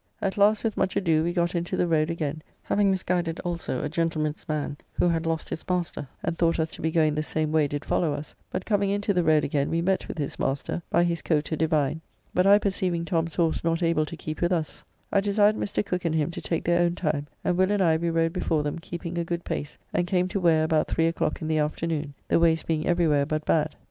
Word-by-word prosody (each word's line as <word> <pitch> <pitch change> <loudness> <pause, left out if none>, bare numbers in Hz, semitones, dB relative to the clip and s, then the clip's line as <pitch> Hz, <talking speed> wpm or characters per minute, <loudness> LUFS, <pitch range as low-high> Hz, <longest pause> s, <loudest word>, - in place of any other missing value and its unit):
At 195 -1 -1
last 210 +1 +4
with 225 -2 -1
much 190 - 0
ado 160 -4 +2
we 170 - 0
got 175 0 0
into 175 +1 -2
the 180 - +2
road 155 -1 +2
again, 155 -2 -3 0.2
having 205 -1 +2
misguided 180 -3 0
also 170 -7 -3
a - - 0
gentleman's 160 -1 -2
man 150 -1 -2 0.2
who - - +2
had 165 -1 0
lost 165 -1 -1
his - - -5
master 175 -5 -2 0.2
and 170 0 -1
thought 165 0 +1
us 160 0 0
to - - -9
be 160 - +1
going 160 -2 +2
the 155 - 0
same 155 0 -1
way 155 -2 +3
did 145 +1 -4
follow 165 -4 +1
us, 145 +1 -5 0.2
but 185 - -4
coming 205 -2 +1
into 200 0 0
the 180 -2 +2
road 155 -2 +4
again 140 0 0
we 165 - 0
met 190 +3 0
with - - -6
his 145 -3 -4
master, 140 +5 -1
by 170 - +3
his 170 -1 0
coat 155 -1 0
a - - +1
divine, 155 -1 +1 0.3
but 180 +1 +3
I 200 +1 +8
perceiving 185 -4 -1
Tom's 165 -3 -1
horse 165 -2 +1
not 165 +1 0
able 165 -2 +2
to 165 - -7
keep 155 0 -6
with 175 +1 +2
us, 165 -4 -2 0.3
I 200 - +3
desired 205 +1 +3
Mr. 205 0 -2
Cooke 180 -3 -3
and 165 -1 +1
him 155 +1 +1
to - - -6
take 165 - -2
their 175 +1 +3
own 175 0 +2
time, 150 -4 -1 0.2
and 180 - +1
Will 185 +1 +3
and 205 - +1
I 165 -2 +4
we 170 +1 -1
rode 165 0 +1
before 160 -4 0
them 145 +2 -3
keeping 170 0 -5
a - - 0
good 170 0 -4
pace, 145 +1 -4 0.2
and 175 - +1
came 180 0 +1
to 195 - -1
Ware 165 -3 +4
about 160 -1 +2
three 165 - +1
o'clock 165 -1 -1
in - - -2
the 155 -1 +1
afternoon, 150 -1 -2
the - - +3
ways 165 -1 +3
being 160 -1 -1
every 175 -1 +3
where 145 -2 +2
but 155 0 -2
bad. 155 -1 +1
165 Hz, 255 wpm, -26 LUFS, 155-175 Hz, 0.3 s, I